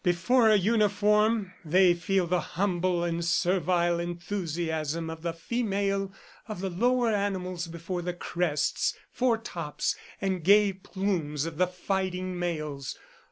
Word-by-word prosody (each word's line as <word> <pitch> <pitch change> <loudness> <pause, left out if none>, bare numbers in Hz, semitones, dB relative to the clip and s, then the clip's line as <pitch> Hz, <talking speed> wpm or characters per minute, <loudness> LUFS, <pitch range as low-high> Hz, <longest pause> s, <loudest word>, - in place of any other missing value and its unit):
Before 205 +7 +3
a 215 - +6
uniform, 210 0 +2
they 180 +3 +5
feel 180 +2 0
the 180 +1 +1
humble 180 0 0
and 170 0 -1
servile 175 0 +2
enthusiasm 170 -3 -3
of 160 0 -8
the 170 0 -1
female 195 +1 -1 0.4
of 215 -4 -6
the 190 -1 -2
lower 240 +5 +2
animals 185 -4 -2
before 170 +2 -5
the 180 0 -3
crests, 170 -5 0 0.2
foretops 225 - -1 0.2
and 190 -3 -1
gay 200 +2 +5
plumes 185 -6 -2
of 165 -1 -6
the 185 - +4
fighting 185 0 -2
males. 155 -6 -3
180 Hz, 125 wpm, -28 LUFS, 170-200 Hz, 0.4 s, a